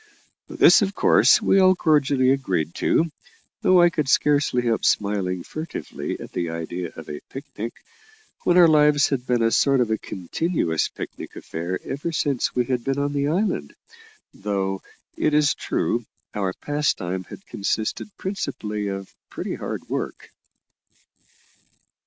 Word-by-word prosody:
This, -, -, +6 dB
of 200 Hz, 0 st, -1 dB
course, -, -, +5 dB
we 195 Hz, -, +4 dB
all 185 Hz, 0 st, +6 dB
cordially 145 Hz, -6 st, +3 dB
agreed 95 Hz, -, -1 dB
to, 165 Hz, 0 st, +1 dB, 0.5 s
though 185 Hz, -1 st, +5 dB
I 175 Hz, -, +5 dB
could 150 Hz, -5 st, -1 dB
scarcely 145 Hz, -4 st, +2 dB
help 115 Hz, -2 st, 0 dB
smiling 95 Hz, -3 st, 0 dB
furtively 155 Hz, +1 st, -6 dB
at -, -, -9 dB
the 85 Hz, -1 st, -2 dB
idea 85 Hz, +1 st, -5 dB
of 80 Hz, -, -10 dB
a 75 Hz, 0 st, -6 dB
picnic, 120 Hz, -5 st, -7 dB, 0.7 s
when 175 Hz, -, +3 dB
our 175 Hz, -2 st, +8 dB
lives 150 Hz, -2 st, +4 dB
had 130 Hz, -2 st, -2 dB
been 120 Hz, -2 st, +2 dB
a 115 Hz, -, +3 dB
sort 140 Hz, +2 st, +3 dB
of 120 Hz, -3 st, +1 dB
continuous 90 Hz, -, -1 dB
picnic -, -, -8 dB
affair 85 Hz, +3 st, -4 dB
ever 145 Hz, +5 st, -4 dB
since 145 Hz, -5 st, -1 dB
we 125 Hz, -1 st, +2 dB
had 125 Hz, -1 st, -1 dB
been 135 Hz, +2 st, -1 dB
on 145 Hz, 0 st, -1 dB
the 140 Hz, 0 st, 0 dB
island, 165 Hz, -, -1 dB, 0.6 s
though, 95 Hz, -1 st, -2 dB, 0.3 s
it 150 Hz, -, +1 dB
is 150 Hz, -2 st, +4 dB
true, 120 Hz, -, -1 dB, 0.3 s
our 100 Hz, -3 st, -1 dB
pastime 95 Hz, -12 st, -2 dB
had 195 Hz, -, -12 dB
consisted 110 Hz, +2 st, -2 dB
principally 105 Hz, -, -3 dB
of 95 Hz, -1 st, -5 dB, 0.2 s
pretty -, -, -5 dB
hard -, -, -5 dB
work. -, -, -5 dB
130 Hz, 145 wpm, -23 LUFS, 95-150 Hz, 0.7 s, our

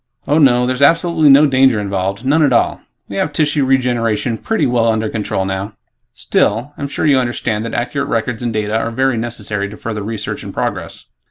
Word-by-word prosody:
"Oh, 150 Hz, +2 st, +3 dB
no. 125 Hz, -4 st, +4 dB
There's 130 Hz, +1 st, -2 dB
absolutely 165 Hz, +1 st, +4 dB
no 140 Hz, +2 st, +7 dB
danger 130 Hz, -4 st, +3 dB
involved. 100 Hz, +2 st, -3 dB
None 150 Hz, +4 st, +3 dB
at 145 Hz, -3 st, +3 dB
all. 120 Hz, -, +1 dB, 0.3 s
We 100 Hz, -, -6 dB
have 150 Hz, -, 0 dB
tissue 150 Hz, -1 st, +1 dB
regeneration 120 Hz, -4 st, 0 dB
pretty 225 Hz, -, 0 dB
well 120 Hz, -2 st, +1 dB
under 110 Hz, -1 st, 0 dB
control 105 Hz, -3 st, -2 dB
now. 95 Hz, +2 st, -4 dB, 0.4 s
Still, 120 Hz, +8 st, 0 dB
I'm 140 Hz, -, -4 dB
sure 140 Hz, -, -3 dB
you 140 Hz, -3 st, +4 dB
understand 120 Hz, -3 st, -2 dB
that 115 Hz, -, -5 dB
accurate 140 Hz, +4 st, -2 dB
records 115 Hz, 0 st, -2 dB
and 120 Hz, -1 st, -2 dB
data 105 Hz, -1 st, -2 dB
are 115 Hz, -, 0 dB
very 130 Hz, +1 st, 0 dB
necessary 105 Hz, -3 st, -3 dB
to 105 Hz, -, -10 dB
further 110 Hz, -2 st, -5 dB
research 110 Hz, +1 st, -5 dB
and -, -, -7 dB
progress." -, -, -4 dB
120 Hz, 195 wpm, -16 LUFS, 110-135 Hz, 0.4 s, no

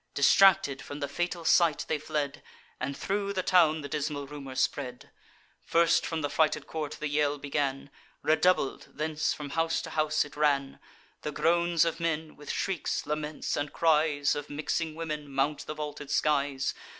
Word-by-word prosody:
Distracted, 175 Hz, -2 st, +5 dB
from 145 Hz, +3 st, -7 dB
the 140 Hz, -, -2 dB
fatal 175 Hz, +3 st, -3 dB
sight 165 Hz, -4 st, +4 dB
they 155 Hz, -, 0 dB
fled, 145 Hz, -2 st, -3 dB, 0.4 s
And 140 Hz, +2 st, -3 dB
thro' 200 Hz, 0 st, -1 dB
the 190 Hz, -2 st, -1 dB
town 165 Hz, -4 st, +4 dB
the 140 Hz, -, -5 dB
dismal 145 Hz, 0 st, -3 dB
rumour 135 Hz, -2 st, -8 dB
spread. 125 Hz, -2 st, -2 dB, 0.5 s
First 170 Hz, 0 st, +3 dB
from 160 Hz, -2 st, -3 dB
the 145 Hz, -, 0 dB
frighted 155 Hz, -2 st, +2 dB
court 155 Hz, -2 st, -5 dB
the 150 Hz, -, -2 dB
yell 145 Hz, 0 st, +1 dB
began; 140 Hz, -1 st, -2 dB, 0.3 s
Redoubled, 160 Hz, -2 st, +2 dB
thence 155 Hz, 0 st, -1 dB
from 145 Hz, -2 st, -5 dB
house 165 Hz, +1 st, +1 dB
to 165 Hz, -, -7 dB
house 155 Hz, 0 st, +1 dB
it 145 Hz, -, -13 dB
ran: 140 Hz, -2 st, +1 dB, 0.4 s
The 150 Hz, -, -3 dB
groans 170 Hz, +1 st, +2 dB
of 165 Hz, 0 st, -2 dB
men, 160 Hz, -2 st, -2 dB
with 145 Hz, -, -12 dB
shrieks, 190 Hz, -5 st, -2 dB
laments, 150 Hz, 0 st, -3 dB
and 145 Hz, 0 st, -2 dB
cries 150 Hz, -3 st, +2 dB
Of 145 Hz, 0 st, -5 dB
mixing 155 Hz, +2 st, -2 dB
women, 150 Hz, -3 st, -5 dB
mount 140 Hz, +2 st, -1 dB
the 155 Hz, -, -4 dB
vaulted 150 Hz, -1 st, -6 dB
skies. 140 Hz, -2 st, +1 dB
150 Hz, 165 wpm, -29 LUFS, 145-165 Hz, 0.5 s, Distracted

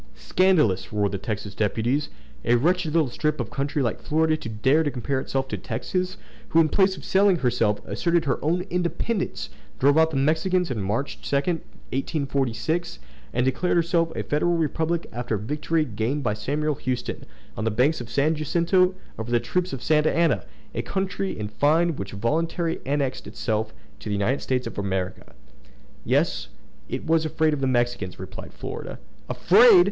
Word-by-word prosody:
"Scandalous!" 110 Hz, -, +2 dB
roared 105 Hz, -2 st, +1 dB
the 100 Hz, -, -3 dB
Texas 105 Hz, -1 st, -4 dB
deputies. 115 Hz, +8 st, 0 dB, 0.3 s
"A 120 Hz, -, +4 dB
wretched 170 Hz, +5 st, +2 dB
little 155 Hz, -6 st, +2 dB
strip 150 Hz, +3 st, -1 dB
of -, -, -3 dB
country 140 Hz, +1 st, -1 dB
like 115 Hz, -, -1 dB
Florida 160 Hz, +1 st, +2 dB
to 120 Hz, -, -6 dB
dare 130 Hz, +8 st, +3 dB
to 155 Hz, -, +1 dB
compare 135 Hz, 0 st, -2 dB
itself 135 Hz, 0 st, -2 dB
to -, -, -3 dB
Texas, 185 Hz, +1 st, -2 dB, 0.3 s
who, 165 Hz, -, +4 dB
in 160 Hz, -1 st, +5 dB
place 190 Hz, +1 st, +3 dB
of -, -, -10 dB
selling 195 Hz, 0 st, +4 dB
herself, 120 Hz, -8 st, +1 dB
asserted 170 Hz, +3 st, +1 dB
her 135 Hz, -3 st, -1 dB
own 170 Hz, +4 st, +1 dB
independence, 180 Hz, +4 st, -2 dB, 0.3 s
drove 145 Hz, +4 st, +4 dB
out 160 Hz, 0 st, +5 dB
the 150 Hz, -, -3 dB
Mexicans 160 Hz, +4 st, +1 dB
in 115 Hz, -5 st, -2 dB
March 105 Hz, +9 st, -2 dB
2, -, -, -2 dB
1846, 140 Hz, -1 st, -2 dB, 0.3 s
and 125 Hz, +1 st, +1 dB
declared 175 Hz, +7 st, +1 dB
herself 170 Hz, -1 st, +2 dB
a -, -, -2 dB
federal 170 Hz, +4 st, +1 dB
republic 160 Hz, +2 st, 0 dB
after 120 Hz, -2 st, -2 dB
the 100 Hz, -, -7 dB
victory 150 Hz, +5 st, 0 dB
gained 120 Hz, +5 st, -2 dB
by 105 Hz, -, +1 dB
Samuel 150 Hz, +8 st, -1 dB
Houston, 130 Hz, -2 st, -3 dB, 0.3 s
on -, -, -3 dB
the 115 Hz, -, +2 dB
banks 125 Hz, +7 st, +2 dB
of 120 Hz, -, -7 dB
the 115 Hz, -, -11 dB
San 145 Hz, +3 st, +3 dB
Jacinto, 175 Hz, +4 st, +2 dB, 0.2 s
over 110 Hz, +1 st, -4 dB
the 120 Hz, 0 st, +3 dB
troops 180 Hz, +10 st, -1 dB
of 130 Hz, -, -5 dB
Santa 155 Hz, 0 st, +3 dB
Anna!—a 160 Hz, -, -1 dB
country, 195 Hz, 0 st, -2 dB
in 105 Hz, -1 st, -3 dB
fine, 155 Hz, +9 st, +2 dB
which 100 Hz, -4 st, -6 dB
voluntarily 165 Hz, -, -1 dB
annexed 140 Hz, -2 st, -1 dB
itself 110 Hz, -1 st, -2 dB, 0.3 s
to 105 Hz, -, -7 dB
the 105 Hz, -, 0 dB
United 110 Hz, +8 st, 0 dB
States 125 Hz, -1 st, -1 dB
of -, -, -5 dB
America!" 95 Hz, -2 st, -3 dB, 0.7 s
"Yes; -, -, +1 dB, 0.4 s
because -, -, -2 dB
it -, -, -12 dB
was 160 Hz, 0 st, +3 dB
afraid 155 Hz, 0 st, +1 dB
of 145 Hz, -, -2 dB
the 135 Hz, -, +2 dB
Mexicans!" 120 Hz, -7 st, 0 dB
replied 95 Hz, -, -8 dB
Florida. -, -, -6 dB, 0.3 s
"Afraid!" 210 Hz, +2 st, +7 dB
145 Hz, 175 wpm, -25 LUFS, 120-165 Hz, 0.7 s, Afraid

